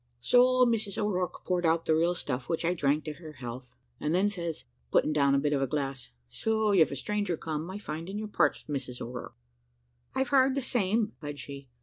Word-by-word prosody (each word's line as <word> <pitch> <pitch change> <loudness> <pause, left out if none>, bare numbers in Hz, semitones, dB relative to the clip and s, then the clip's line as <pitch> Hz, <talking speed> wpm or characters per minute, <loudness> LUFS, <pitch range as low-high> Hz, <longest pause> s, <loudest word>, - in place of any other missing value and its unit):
"So 250 - +5
Mrs 220 -4 0
O'Rourke 185 -4 -1
poured 180 -1 0
out 165 0 +2
the 160 - +3
real 170 +2 +2
stuff, 130 -5 -3
which 165 0 0
I 175 - +3
drank 150 -2 +1
to 155 - -3
her 155 -1 -11
health; 125 -1 -8 0.2
and 150 +3 0
then 195 +3 +3
says 170 -8 -4
I, 120 - -43 0.2
putting 155 - +3
down 140 -2 +3
the - - +4
bit 145 +1 +1
of 140 - +1
a 135 - +1
glass, 135 -2 -3 0.2
`So 220 -2 +1
you've 160 -4 +5
a - - -3
stranger 205 +4 -1
come, 155 +2 -4
I 190 - -5
find, 165 -4 -6
in 200 - -4
your 215 0 -3
parts, 210 - +1
Mrs 130 -4 -4
O'Rourke.' 125 +1 -7 0.8
"`I've 265 -1 +1
heard 265 0 +4
the 275 - -1
same,' 215 -2 +1
replied 145 -1 -5
she. 140 -2 -8
165 Hz, 220 wpm, -29 LUFS, 140-205 Hz, 0.8 s, So